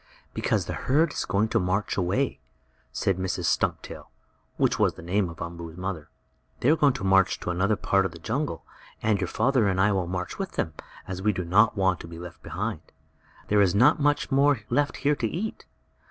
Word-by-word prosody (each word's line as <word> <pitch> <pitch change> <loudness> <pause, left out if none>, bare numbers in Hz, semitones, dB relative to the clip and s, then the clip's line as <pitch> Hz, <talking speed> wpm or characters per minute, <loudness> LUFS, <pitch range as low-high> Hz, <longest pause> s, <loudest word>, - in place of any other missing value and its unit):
"Because - - 0
the - - -4
herd 150 +4 +1
is - - -2
going 105 +3 +1
to - - +2
march 95 +3 -1
away," 100 +9 0 0.5
said 95 -2 0
Mrs. 95 -1 -2
Stumptail, 80 - -1 0.5
which - - +1
was - - +2
the - - -11
name 95 +2 0
of 80 +1 -7
Umboo's 85 -1 -8
mother. 90 -5 -5 0.5
"They 130 - +4
are - - +5
going 145 -4 +3
to 95 - -6
march 95 0 +3
to - - -2
another 95 +5 +1
part 95 -1 +1
of - - -13
the 85 - -11
jungle, 110 - -3 0.4
and 105 -2 +2
your 90 - 0
father 120 +2 +2
and 95 -1 0
I 105 +2 +4
will 95 -3 0
march 90 - -4
with 195 -2 -4
them, 80 - -2 0.3
as 95 0 -5
we 105 +2 +2
do 90 -3 -4
not 105 +5 +4
want 95 -2 +2
to - - -9
be 85 0 -9
left 85 0 -10
behind. 105 -3 -4 0.7
There 105 0 +4
is 95 -1 +3
not 130 +10 +5
much 145 0 +1
more 140 -2 +3
left 145 0 +1
here 145 +1 +4
to 115 - -1
eat. 200 - -4
100 Hz, 210 wpm, -26 LUFS, 90-125 Hz, 0.7 s, are